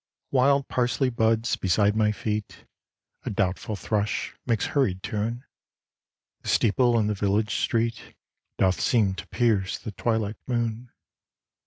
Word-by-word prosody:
Wild 140 +1 +3
parsley 125 +1 +1
buds 115 0 +1
beside 100 +3 +2
my 110 -1 +3
feet, 105 0 -4 0.6
A - - -3
doubtful 100 +2 -1
thrush 105 +1 -2
makes 115 -3 +1
hurried 100 -10 +1
tune, 115 +5 -3 1.0
The - - -12
steeple 120 +2 +3
in 110 - +2
the 105 - 0
village 105 +1 0
street 115 0 -1 0.4
Doth 95 -1 +2
seem 105 -6 +3
to 95 - -8
pierce 105 -6 +1
the 110 - -7
twilight 110 0 -1
moon. 120 -1 -2
110 Hz, 130 wpm, -26 LUFS, 105-120 Hz, 1.0 s, Wild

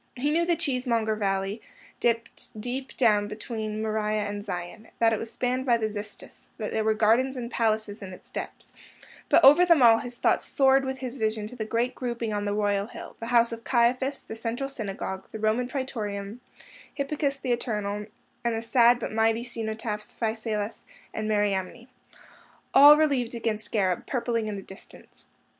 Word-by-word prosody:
He 280 +4 0
knew 340 +2 +2
the 345 - +3
Cheesemonger's 245 -8 -1
Valley 195 +1 -1 0.4
dipped 230 -2 -2
deep 255 +4 -5
down 210 -4 +3
between 215 0 -4
Moriah 215 -1 0
and 205 0 -4
Zion; 185 +3 -6
that 225 -1 +3
it 220 - -1
was 225 - -6
spanned 250 +1 -1
by 240 -3 +3
the 220 -1 -1
Xystus; 210 0 -9
that 210 - -4
there 220 - 0
were 220 0 +2
gardens 235 +5 +3
and 240 -1 -5
palaces 220 -2 0
in 190 -1 -7
its 185 - -13
depths; - - -7 0.6
but 345 - +5
over 295 +6 +8
them 335 -6 +5
all 225 -1 +7
his 245 0 -7
thoughts - - +1
soared 270 0 +4
with 265 0 -3
his 255 0 -5
vision 215 -1 -1
to 230 +4 -9
the 220 -3 -4
great 235 +3 0
grouping 235 -3 -3
on 205 0 -2
the 205 - -1
royal 205 -1 0
hill—the 230 - -9
house 235 -1 +4
of 230 0 -7
Caiaphas, 250 +3 +1
the 220 - -8
Central 230 +4 -3
Synagogue, 195 -6 -5
the - - -5
Roman 220 +3 +1
Praetorium, 220 -5 -4 0.6
Hippicus 280 -1 -1
the 255 - -2
eternal, 210 -3 -2 0.4
and 235 -1 0
the 225 - -3
sad 240 0 +5
but - - -4
mighty 225 +1 +2
cenotaphs 220 -2 -5
Phasaelus 220 -1 -3 0.3
and 215 0 -3
Mariamne—all 215 +7 +2
relieved 270 -6 +1
against 220 -2 -2
Gareb, 190 -5 0
purpling 235 -3 -1
in 210 - -3
the 195 - -7
distance. 190 +1 -15
225 Hz, 175 wpm, -27 LUFS, 210-250 Hz, 0.6 s, over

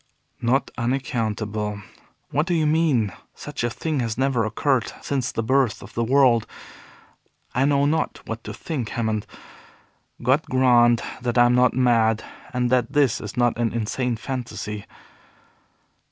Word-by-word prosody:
"Not 130 +3 +1
unaccountable! 110 -4 -2 0.5
What 150 +3 +1
do 175 - +1
you 160 -2 +2
mean? 150 - +2 0.2
Such - - -6
a 120 - +1
thing 155 +5 -2
has 115 -3 -2
never 130 -3 +1
occurred 120 +1 0
since 135 -3 -1
the 115 - -2
birth 130 -2 +1
of 100 +3 -12
the 115 - 0
world. 125 -2 +4 1.1
I 130 +2 +2
know 140 0 +3
not 160 +2 0
what 115 0 -6
to - - -5
think, 130 -9 -4
Hammond. 110 -3 -2 1.0
God 130 +5 +3
grant 120 -2 +4 0.2
that 125 -1 -1
I 120 - +7
am 120 - +3
not 125 0 +4
mad, 115 -3 +3 0.3
and 125 -1 0
that 125 +1 +1
this 140 -5 +2
is 105 +2 -7
not 120 -1 +3
an 115 -2 0
insane 120 +2 -1
fantasy!" 110 -4 -5
120 Hz, 150 wpm, -23 LUFS, 115-135 Hz, 1.1 s, I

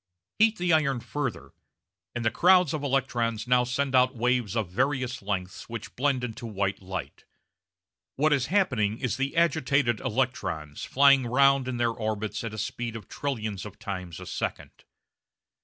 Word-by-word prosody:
Heat 220 0 +4
the 175 -1 +1
iron 140 -5 +2
further, 130 - -4 0.6
and 120 -1 -3
the 115 - +3
crowds 180 - +4
of 155 - -2
electrons 120 -5 0
now 125 0 +4
send 135 +2 -1
out 130 +1 +4
waves 120 -2 0
of 105 -6 -1
various 130 +2 -1
lengths 95 -1 -4
which 115 -2 -7
blend 135 -1 +1
into 115 0 -5
white 100 -2 -2
light. 95 -7 -6 0.9
What 150 +2 +3
is 130 -3 +1
happening 125 - +1
is 125 -2 -2
the 135 +4 -2
agitated 140 -7 +2
electrons 105 - -2
flying 140 -2 +5
round 135 +1 +4
in 130 -1 -2
their 120 -1 +1
orbits 110 -1 -3
at 115 - -4
a - - -8
speed 115 +2 -4
of 105 -5 -9
trillions 110 -9 -3
of 105 - -9
times 95 -6 -6
a 90 - -8
second. - - -5
125 Hz, 160 wpm, -27 LUFS, 105-140 Hz, 0.9 s, flying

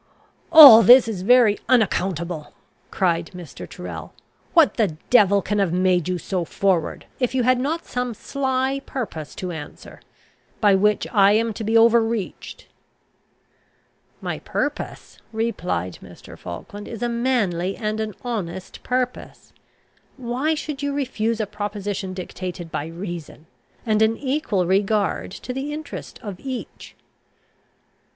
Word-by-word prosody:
"All 285 -9 +11
this 245 +3 +8
is 210 -5 -4
very 225 0 +4
unaccountable," 180 - 0 0.4
cried 170 -3 0
Mr. 175 -4 -9
Tyrrel. - - -8 0.4
"What 330 -3 +6
the 195 -10 0
devil 200 -5 +5
can 210 +1 -1
have 195 -4 +1
made 180 -1 +1
you 180 - -1
so 180 0 -3
forward, 180 0 -1
if 250 0 -1
you 255 - +2
had 255 +1 +3
not 310 +6 -2
some 245 -2 -3
sly 265 +2 -2
purpose 165 - -6
to 180 -1 -5
answer, 155 -3 -10 0.6
by 205 -2 +4
which 210 +2 +2
I 200 -2 +5
am 225 +1 +1
to 220 - -6
be 225 +2 +2
overreached?" 225 -3 +1 1.6
"My - - -4
purpose," - - -4
replied 195 - -3
Mr. - - -13
Falkland, 200 - -9
"is 230 0 -6
a - - +1
manly 230 -7 0
and 215 0 -3
an 215 -3 -4
honest 190 -7 -5
purpose. 250 0 -4 0.6
Why 260 +5 -1
should 295 -2 -5
you 285 0 -2
refuse 230 -5 -1
a 215 - 0
proposition 205 -2 -5
dictated 180 -2 -7
by 145 - -3
reason, 170 -3 -8 0.4
and 215 -1 +1
an 220 +1 +3
equal 260 - -1
regard 200 +3 0
to 250 +6 -7
the 270 +3 -4
interest 305 0 -7
of 200 -4 -7
each?" 260 -2 -7
215 Hz, 135 wpm, -22 LUFS, 185-250 Hz, 1.6 s, All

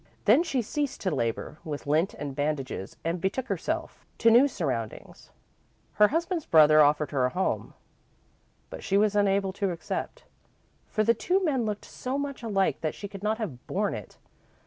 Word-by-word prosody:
Then 220 +9 +6
she 275 -8 -1
ceased 285 +4 -3
to 185 - 0
labour 115 +6 -2
with 150 -2 -5
lint 155 +6 +1
and 140 -2 -6
bandages 140 -8 -3
and 165 +1 -2
betook 220 +8 -2
herself - - -3
to 230 - +5
new 245 +5 +7
surroundings. 130 - -5 0.6
Her 210 - +6
husband's 335 - -2
brother 155 -1 +7
offered 145 -1 +3
her 130 -3 +2
a - - -2
home, 185 +7 -2 1.0
but - - -8
she 195 - +1
was 210 0 +3
unable 195 -1 +2
to 200 0 -1
accept, 180 - -4 0.6
for 215 - 0
the 230 +2 +4
two 370 - 0
men 265 -7 +1
looked 210 -1 -3
so 255 +2 -4
much 280 -2 -4
alike 200 -5 0
that 155 - -2
she 200 - -6
could 195 -1 -10
not 215 +1 0
have 160 - -6
borne - - 0
it. - - -8
200 Hz, 175 wpm, -27 LUFS, 155-240 Hz, 1.0 s, new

